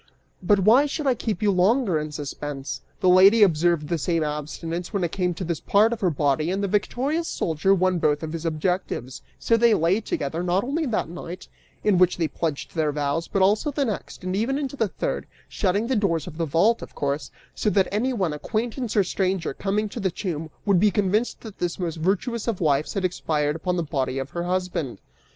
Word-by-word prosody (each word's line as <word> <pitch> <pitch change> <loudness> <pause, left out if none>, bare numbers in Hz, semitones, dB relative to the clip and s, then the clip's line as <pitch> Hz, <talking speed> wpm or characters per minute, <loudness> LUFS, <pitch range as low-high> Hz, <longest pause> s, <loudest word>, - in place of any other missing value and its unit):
"But 195 +2 +3
why 240 +9 +5
should 295 +1 -4
I 265 - +4
keep 215 -4 -3
you 205 - +4
longer 190 - +2
in 150 0 -5
suspense? 145 -1 -5 0.2
The - - +2
lady 195 +5 +7
observed 170 -3 +2
the 170 +1 -1
same 165 +1 0
abstinence 155 +3 -4
when 200 -4 -1
it 170 - -1
came 180 -2 -1
to 185 - -5
this 170 -2 -2
part 215 +3 +3
of 230 - -6
her 185 - +3
body, 150 +1 +1
and 195 +2 -1
the - - +1
victorious 270 - 0
soldier 165 +5 +1
won 185 -1 +1
both 150 0 +1
of 160 0 -4
his 165 -1 -4
objectives; 155 -5 -2 0.2
so 230 - +2
they 230 -1 +5
lay 175 +7 +2
together, 160 -4 -3
not 180 +2 +1
only 295 +5 -1
that 225 -9 -1
night, 175 +2 -8 0.4
in 200 -4 +3
which 180 -1 +4
they 165 -2 +1
pledged 155 -2 -4
their 155 -3 +1
vows, 145 +3 -1
but 195 - +1
also 210 +9 +3
the 285 0 0
next, 215 -4 -5
and 185 +1 -2
even 230 +7 0
the 250 -5 -1
third, - - -3 0.2
shutting 200 +3 0
the 260 +2 0
doors 185 -7 +1
of 170 -2 -9
the 165 - 0
vault, 200 +10 +3
of - - -10
course, 140 +1 -2 0.2
so 215 - 0
that 195 -2 +3
anyone, 210 -6 0
acquaintance 225 - -3
or 200 - +6
stranger, 185 -4 -1
coming 205 +5 -1
to 220 - -7
the 195 -3 +1
tomb, 165 -3 -4 0.2
would 200 -4 +4
be 210 +3 +5
convinced 205 +4 0
that 220 -4 -10
this 175 -1 -2
most 170 -3 -3
virtuous 205 +8 -1
of 225 -5 -1
wives 150 0 +1
had 195 -2 0
expired 150 -4 0
upon 180 +2 -2
the 170 - 0
body 135 -4 -2
of 135 0 -4
her 170 0 -3
husband. 180 - -2
180 Hz, 215 wpm, -24 LUFS, 160-210 Hz, 0.4 s, lady